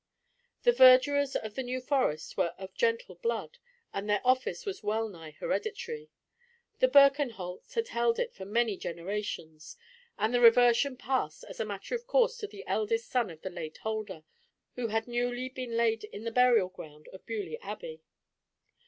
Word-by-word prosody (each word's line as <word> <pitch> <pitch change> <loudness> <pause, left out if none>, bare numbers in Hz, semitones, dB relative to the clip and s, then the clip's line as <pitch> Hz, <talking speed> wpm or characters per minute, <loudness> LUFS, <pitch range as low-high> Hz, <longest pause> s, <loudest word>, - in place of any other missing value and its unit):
The 485 - +6
verdurers 270 - +6
of 215 -1 -3
the 265 - -3
New 255 0 -3
Forest 255 - -1
were 170 - 0
of 190 0 -9
gentle 470 0 0
blood, 475 +1 -3 0.3
and 200 +1 -4
their 205 -1 +2
office 255 - +1
was 400 -2 -4
well 220 +1 0
nigh 165 -6 -10
hereditary. 455 - -4 0.7
The - - +5
Birkenholts 275 - +3
had 460 0 -1
held 235 0 +1
it - - -2
for 190 - -9
many 215 +1 0
generations, 170 - -5 0.4
and 220 +3 0
the 245 - +3
reversion 245 +3 +5
passed 255 - -2
as - - -10
a 220 - 0
matter 200 - -6
of 480 0 -3
course - - +3
to 425 - -5
the 405 +1 -11
eldest 455 +2 -1
son 240 -5 +1
of 160 -2 -12
the 190 - -4
late 165 -3 -7
holder, 215 -7 -4 0.5
who 245 -2 -2
had 225 +1 -1
newly 245 +1 -2
been 255 -3 -5
laid 225 -1 +2
in 210 0 -9
the 230 - -3
burial 235 -6 +4
ground 155 -5 -12
of 190 - -13
Beaulieu 225 - -4
Abbey. 480 -1 -7
240 Hz, 170 wpm, -30 LUFS, 205-285 Hz, 0.7 s, The